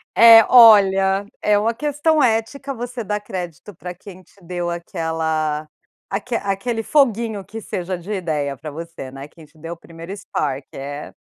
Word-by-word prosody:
Eh. 225 -1 +9
Olha, 195 -4 +6 0.2
é 210 -1 +3
uma 225 +3 +1
questão 295 +4 +1
ética, 255 +4 0
você 245 0 -6
dá 210 0 -2
crédito 185 -1 -7
pra 180 +1 -7
quem 185 +1 -13
te - - -27
deu 175 0 -4
aquela 160 -3 -2 0.4
aque 225 +5 -3
aquele 225 +3 -2
foguinho 230 -7 +1
que 225 +3 -8
seja 185 -1 -4
de 180 +5 -9
ideia 150 -7 -2
pra 155 - -8
você, 165 -3 -8
né. 135 +1 -9
Quem 160 -1 -16
te 155 +1 -25
deu 165 +2 -7
o - - -12
primeiro 165 +2 -11
spark. 140 -8 -3
É 145 +2 -7
190 Hz, 165 wpm, -20 LUFS, 165-225 Hz, 0.4 s, Eh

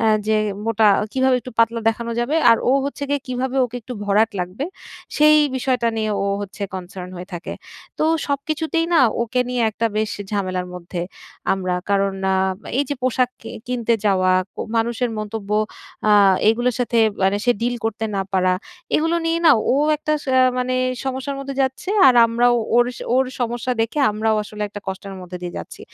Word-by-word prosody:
অ্যা 225 - +3 0.2
যে 220 0 +3 0.3
মোটা, 220 -1 +3 0.2
কীভাবে 260 -1 +3
একটু 255 - -9
পাতলা 230 0 +3
দেখানো 230 +1 -2
যাবে। 265 +7 0
আর 230 - +6
ও - - +4
হচ্ছে 285 0 -5
গিয়ে 285 0 0
কীভাবে 255 +1 -2
ওকে 245 0 -5
একটু 250 - -8
ভরাট 210 +2 +3
লাগবে, 180 +9 -4 0.5
সেই 305 0 +6 0.2
বিষয়টা 250 -2 0
নিয়ে 215 -1 -1
ও - - 0
হচ্ছে 205 +1 -7
concern 180 0 -7
হয়ে 180 +2 -8
থাকে। 175 - -6 0.5
তো - - +2 0.2
সবকিছুতেই 310 +3 -1
না, - - +6 0.2
ওকে 235 +2 -1
নিয়ে 250 -1 0
একটা 225 +2 -1
বেশ 215 0 0 0.2
ঝামেলার 185 -3 -2
মধ্যে 175 0 -6 0.5
আমরা। 185 -2 -1 0.2
কারণ 195 -1 +2 0.2
আ - - +2 0.4
এই 285 - +2
যে 285 - -1
পোশাক 255 0 +1
কি - - -8 0.2
কিনতে 235 -2 +1
যাওয়া, 185 -2 +3 0.2
ক - - -60 0.2
মানুষের 235 +1 0
মন্তব্য, 215 -1 -5 0.6
আ 210 - +6 0.4
এইগুলার 240 +2 +2
সাথে 235 -1 +1 0.2
মানে 195 +1 +3
সে 245 - +4
deal 245 +1 0
করতে 225 0 -2
না 195 - +1
পারা, 185 -1 +3 0.4
এগুলো 325 +2 +1
নিয়ে 330 0 +1
না - - +9 0.2
ও - - +3 0.2
একটা 305 +1 -2
সা 265 - -1 0.3
মানে 255 0 -1 0.3
সমস্যার 265 +1 -3
মধ্যে 275 0 -5
যাচ্ছে, 265 +7 -3 0.2
আর 255 - +5
আমরাও 240 +1 +3 0.2
ওর 240 0 +5 0.3
ওর 265 +1 +4 0.2
সমস্যা 240 +1 -1
দেখে 230 +6 -3
আমরাও 220 +1 0
আসলে 210 0 -7
একটা 205 0 -8
কষ্টের 195 +1 -6
মধ্যে 180 0 -8
দিয়ে 175 -1 -5
যাচ্ছি। - - -9
230 Hz, 180 wpm, -21 LUFS, 205-255 Hz, 0.6 s, না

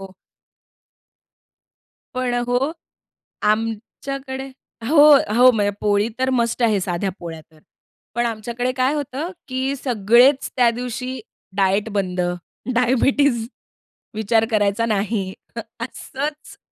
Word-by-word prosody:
हो. 195 -1 -10 2.0
पण 255 -1 -1
अ, 245 - +1
हो. 250 +5 +1 0.7
आमच्याकडे 265 +5 -2 0.4
हो, 300 0 +8 0.2
हो. 250 +2 +7
म्हणजे 205 -3 +1
पोळी 205 0 +2
तर 260 0 +1
मस्ट 235 +1 0
आहे 215 -3 +3
साध्या 180 +2 -1
पोळ्या 165 -2 -7
तर. 155 - -21 0.6
पण 240 0 +1
आमच्याकडे 235 +2 -2
काय 260 +2 +2
होतं 290 +3 -3 0.2
की 260 +1 -1
सगळेच 245 +2 +3
त्या 245 -2 +5
दिवशी 250 +1 -4 0.4
डायट 195 +2 +2
बंद, 185 -3 -1 0.5
डायबिटीज 250 0 +2 0.7
विचार 220 +1 +2
करायचा 210 +1 +2
नाही. 205 -3 -1 0.5
असंच 285 +5 -6
235 Hz, 110 wpm, -21 LUFS, 210-260 Hz, 2.0 s, हो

